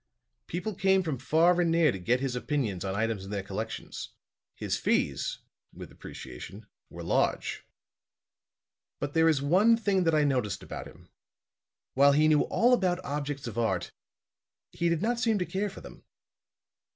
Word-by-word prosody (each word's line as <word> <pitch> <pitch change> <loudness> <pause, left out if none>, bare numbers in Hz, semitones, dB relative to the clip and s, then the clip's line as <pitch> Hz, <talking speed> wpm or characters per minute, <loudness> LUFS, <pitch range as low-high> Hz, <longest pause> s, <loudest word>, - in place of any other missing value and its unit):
People 180 +6 -3
came 190 0 +2
from 155 -7 -3
far 170 +6 +3
and 170 - +2
near 165 -3 +4
to 95 - -6
get 120 +8 +1
his 135 -2 -2
opinion 125 -7 -1
on 95 0 -3
items 110 -2 -1
in 95 - -9
their 100 -2 -3
collections. 100 - -6 0.5
His - - -2
fees," - - 0 0.3
with - - -10
appreciation, 90 - -10 0.2
"were - - -9
large. - - 0 1.3
"But 145 - -3
there 165 0 +4
is 140 -3 +1
one 200 +10 +4
thing 200 -4 +1
that 165 -1 +3
I 150 - +4
noticed 125 -8 0
about - - -7
him. - - -17 0.8
While 140 +1 +5
he 155 +2 +4
knew 155 -1 +4
all 245 +2 +3
about 185 -7 +2
objects 145 -1 -3
of 120 -1 -4
art, 95 -7 -1 0.8
he 170 - 0
did 170 +2 0
not 235 +1 0
seem 225 -3 +2
to 180 - -1
care 200 +3 -2
for 195 - -11
them. - - -13
150 Hz, 165 wpm, -29 LUFS, 120-180 Hz, 1.3 s, While